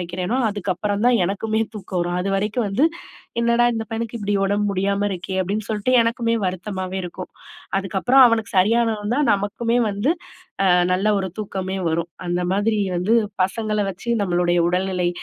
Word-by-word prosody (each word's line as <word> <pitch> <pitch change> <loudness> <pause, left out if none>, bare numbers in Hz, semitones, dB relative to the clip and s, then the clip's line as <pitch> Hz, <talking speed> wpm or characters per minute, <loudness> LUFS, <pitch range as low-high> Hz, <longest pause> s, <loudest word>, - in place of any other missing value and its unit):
வைக்கிறேனோ, 180 +6 -2
அதுக்கப்புறம் 205 +1 -2
தான் 245 -2 +4
எனக்குமே 220 +3 -1
தூக்கம் 185 -3 -4
வரும். 175 +1 -1
அதுவரைக்கும் 200 +4 -1
வந்து, 220 +10 +2 0.6
"என்னடா! 235 0 +3
இந்த 225 - -3
பையனுக்கு 230 +1 -4
இப்படி 205 0 -1
உடம்பு 205 +1 0
முடியாம 200 +1 0
இருக்கே." 185 +1 -5
அப்படீன்னு 205 +4 -3
சொல்ட்டு 215 +3 0
எனக்குமே 230 0 0
வருத்தமாவே 185 0 -4
இருக்கும். 180 +1 -7 0.5
அதுக்கப்புறம் 195 +8 +3
அவனுக்கு 230 -1 -1
சரியானவுந்தான் 225 +5 +2
நமக்குமே 230 +4 -1
வந்து 205 +10 +1 0.5
அ - - +3 0.3
நல்ல 190 +3 +1
ஒரு 190 - -2
தூக்கமே 190 -2 -4
வரும். 165 +1 -1 0.2
அந்த 175 0 0
மாதிரி 210 +2 +1 0.2
வந்து 180 +6 0 0.3
பசங்கள 215 +2 -1
வச்சு 195 +5 -10
நம்மளுடைய 175 -2 +1
உடல்நிலை, 180 0 0
200 Hz, 145 wpm, -22 LUFS, 185-225 Hz, 0.6 s, தான்